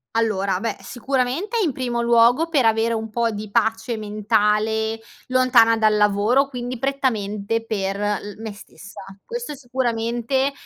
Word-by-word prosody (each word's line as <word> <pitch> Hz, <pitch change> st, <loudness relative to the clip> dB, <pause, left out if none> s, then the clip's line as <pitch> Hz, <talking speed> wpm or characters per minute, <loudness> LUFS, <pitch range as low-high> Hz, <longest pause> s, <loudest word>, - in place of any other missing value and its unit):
Allora, 200 Hz, -4 st, 0 dB
beh 230 Hz, -, -2 dB
sicuramente 265 Hz, -, -2 dB
in 325 Hz, -, +1 dB
primo 245 Hz, -2 st, -2 dB
luogo 235 Hz, +7 st, +4 dB
per 285 Hz, -7 st, +2 dB
avere 225 Hz, +1 st, +2 dB
un 220 Hz, 0 st, -5 dB
pò 235 Hz, +1 st, 0 dB
di 210 Hz, -1 st, -6 dB
pace 225 Hz, +1 st, 0 dB
mentale 215 Hz, +1 st, 0 dB, 0.3 s
lontana 255 Hz, -3 st, +4 dB
dal 215 Hz, -1 st, +3 dB
lavoro, 210 Hz, +6 st, +3 dB
quindi 245 Hz, -2 st, -5 dB
prettamente 225 Hz, -5 st, -1 dB
per 195 Hz, -3 st, -2 dB
l 205 Hz, 0 st, -2 dB
me 220 Hz, -1 st, -5 dB
stessa. 205 Hz, 0 st, -13 dB, 0.2 s
Questo 475 Hz, -7 st, -5 dB
sicuramente 245 Hz, 0 st, -1 dB
230 Hz, 135 wpm, -22 LUFS, 215-255 Hz, 0.3 s, luogo